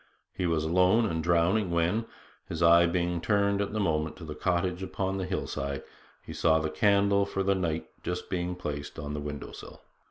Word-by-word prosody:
He 90 - -1
was 80 -2 +1
alone 90 +7 +3
and 80 -6 -2
drowning 85 +4 +2
when, 85 +7 +1 0.4
his 85 0 -2
eye 85 +1 +7
being 85 -1 -1
turned 100 0 +2
at 100 - -2
the 110 - -2
moment 80 -5 0
to 90 - -11
the 75 - -6
cottage 90 +3 -1
upon 95 +1 -2
the 95 - -2
hillside, 70 -7 -3 0.4
he - - -7
saw 80 -1 +3
the 80 -1 -1
candle 100 -2 +3
for 100 -1 -2
the 100 +1 +3
night 85 -4 -2
just 90 0 -4
being 90 -1 -2
placed 75 -5 -5
on 75 0 -5
the 75 - -3
window 75 -1 -6
sill. - - -11
90 Hz, 195 wpm, -28 LUFS, 80-95 Hz, 0.4 s, eye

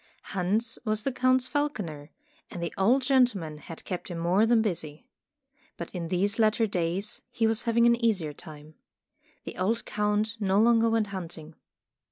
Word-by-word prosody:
Hans 205 +5 -1
was 215 -2 -1
the 275 - 0
Count's 255 0 +2
falconer, 190 - -3 0.4
and 170 - -6
the 170 - -3
old 245 +8 +3
gentleman 240 - +2
had 165 +1 -11
kept 180 -2 -5
him 175 - -5
more 180 +6 +2
than 230 -1 +4
busy. 160 -4 -4 0.7
But 170 - -7
in 175 -3 -4
these 200 +5 0
latter 220 +1 +3
days, 190 +1 -2
he 230 - 0
was 225 +1 +1
having 235 0 +3
an 235 0 +3
easier 185 -10 +1
time. 150 +1 -12 0.7
The - - -8
old 220 +5 0
Count 210 +2 -1
no 195 -1 +2
longer 230 0 +4
went 225 -1 +2
hunting. 165 -4 -7
210 Hz, 165 wpm, -27 LUFS, 170-230 Hz, 0.7 s, than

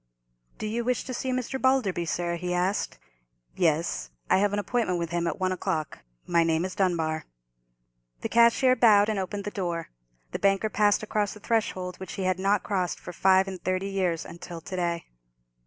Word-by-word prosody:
"Do - - -5
you 225 +3 -1
wish 250 0 0
to 255 - -6
see 260 +2 -3
Mr. 255 +1 -2
Balderby, 250 -10 +2
sir?" 170 +1 -1
he 180 +1 -2
asked. 185 +3 0 0.6
"Yes. 160 - +1 0.2
I - - +6
have 205 0 +2
an 205 - -1
appointment 205 -2 0
with 170 -1 -3
him 170 0 0
at - - -2
one 185 0 +1
o'clock. 170 -5 -2 0.3
My 170 -1 +3
name 165 +1 +1
is 185 - -4
Dunbar." 165 -5 0 1.0
The - - -3
cashier 235 +2 +5
bowed 210 -4 +5
and 215 -2 0
opened 200 +2 -3
the 205 - -4
door. 175 -4 -3 0.4
The - - -3
banker 195 +2 +2
passed 205 +1 +3
across 210 -1 -1
the - - -11
threshold, 190 -5 -1
which 190 - -7
he 195 - -3
had 185 0 +1
not 195 +1 +2
crossed 185 -4 -1
for 180 - -8
five 190 +2 +4
and 190 -2 -7
thirty 185 +1 -1
years 185 -4 -1
until 170 0 -8
to 185 - -7
day. 170 -2 -1
190 Hz, 190 wpm, -27 LUFS, 175-210 Hz, 1.0 s, I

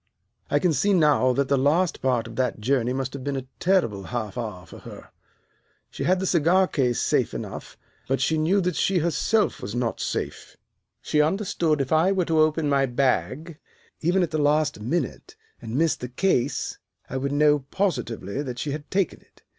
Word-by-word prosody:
"I 145 - +2
can 170 +1 +2
see 200 +9 +2
now 150 -7 +4
that 140 +1 0
the 140 -1 +2
last 160 +6 +1
part 125 -3 +1
of 115 0 -9
that 125 -3 -1
journey 125 +1 +1
must 130 0 -3
have 140 -2 -7
been 140 0 -2
a 130 - -5
terrible 115 - +1
half 110 -3 -4
hour 105 -7 -5
for - - -12
her. - - -12 0.8
She - - -4
had 185 +1 +3
the 190 - -2
cigar 180 +2 +3
case 125 -7 0
safe - - +1
enough, - - -7 0.3
but 135 +1 0
she 155 +4 +1
knew 180 +6 +2
that 180 -2 -1
she 195 - +1
herself 180 +6 +1
was 100 +4 -5
not 120 -1 -1
safe. - - -4 0.5
She 150 - +2
understood 165 -3 0
if 135 - -3
I 160 +4 +4
were 190 -3 +1
to 160 -1 +1
open 155 0 +2
my 140 -1 +2
bag, 140 +5 -1 0.4
even 180 +3 +2
at 175 - -2
the 155 -1 0
last 150 -3 +2
minute, 155 - -3 0.3
and 110 - -6
miss 165 0 +2
the 125 - -7
case, 130 -2 0 0.3
I 135 - -4
would 140 +1 -2
know 150 0 +4
positively 135 - -2
that 125 -4 -5
she 145 +4 -3
had 145 +1 -6
taken 190 -2 -1
it. - - -28
145 Hz, 195 wpm, -24 LUFS, 125-170 Hz, 0.8 s, now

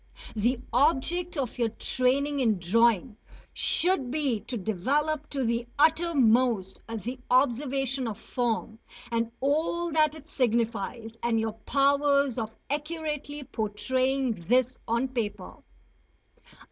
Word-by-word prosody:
The 235 +4 +1
object 325 +6 +2
of 260 -2 -3
your 230 -2 +2
training 270 +5 0
in 225 -6 +2
drawing 220 +4 +2 0.4
should 350 -8 +2
be 275 -5 0
to 245 +3 -6
develop 280 - -1
to 275 -2 -2
the 235 0 -1
uttermost 255 - +3
the 230 +3 -5
observation 265 0 +1
of 220 -1 -5
form 225 -3 -2 0.3
and 230 0 0
all 320 +5 0
that 310 -1 +3
it 305 -2 -12
signifies, 230 -3 -1
and 235 -1 +1
your 220 -1 -1
powers 280 +2 +2
of 220 -1 -5 0.2
accurately 300 -1 -3
portraying 255 +4 -1 0.2
this 255 +2 +2
on 235 +3 +1
paper. 235 -5 -4
255 Hz, 115 wpm, -27 LUFS, 230-285 Hz, 0.4 s, uttermost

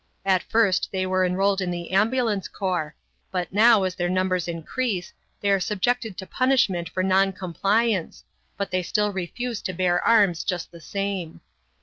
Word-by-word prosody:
At 190 -2 +3
first 210 -5 +2
they 185 -1 -1
were 185 0 +1
enrolled 195 +2 +1
in 185 - -1
the 175 0 -5
ambulance 215 0 +1
corps, 180 -6 -3 0.3
but 180 -1 -3
now, 220 0 +6
as 185 -1 -1
their 175 -1 -2
numbers 185 -1 0
increase, 180 +4 -3 0.3
they 200 - +1
are 195 - +3
subjected 220 +2 -1
to 190 - -6
punishment 205 -10 +1
for 185 +2 -2
non 190 +1 +3
compliance, 195 +2 0 0.3
but 200 -2 -3
they 185 0 +1
still 210 +3 0
refuse 215 +6 -4
to 185 - -4
bear 175 0 +1
arms 200 -7 +4
just 180 -3 -3
the 170 - -13
same. 195 -2 -4
190 Hz, 165 wpm, -24 LUFS, 180-210 Hz, 0.3 s, now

